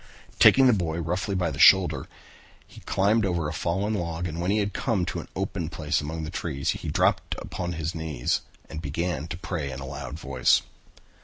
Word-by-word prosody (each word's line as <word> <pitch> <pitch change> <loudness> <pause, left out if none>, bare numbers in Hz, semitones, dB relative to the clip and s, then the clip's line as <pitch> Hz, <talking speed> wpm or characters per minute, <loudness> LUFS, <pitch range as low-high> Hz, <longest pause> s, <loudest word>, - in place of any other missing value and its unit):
Taking 135 - +7
the 125 - +6
boy 85 -6 -1
rather 85 - -3
roughly 95 +5 -2
by 90 -3 0
the - - -7
shoulder, 95 -2 +6 0.6
he - - -15
climbed 105 +4 +2
over 85 -5 0
a - - -4
fallen 95 +5 -1
log 85 -3 -2
and 80 0 -4
when 90 - -1
he 105 - +2
had 100 -1 0
come 110 -9 0
to - - -3
an - - -8
open 95 -3 -3
place 75 -3 -1
among 80 +2 -4
the 80 - -5
trees 70 -6 -2
he - - -6
dropped - - +1
upon 90 -1 -4
his 80 +1 -3
knees 80 -7 -1 0.3
and 80 - -7
began 80 +2 -2
to 80 - -5
pray 80 -5 -4
in 65 - -6
a 70 - -6
loud 70 +2 -6
voice. 65 -5 +2
85 Hz, 210 wpm, -26 LUFS, 80-95 Hz, 0.6 s, Taking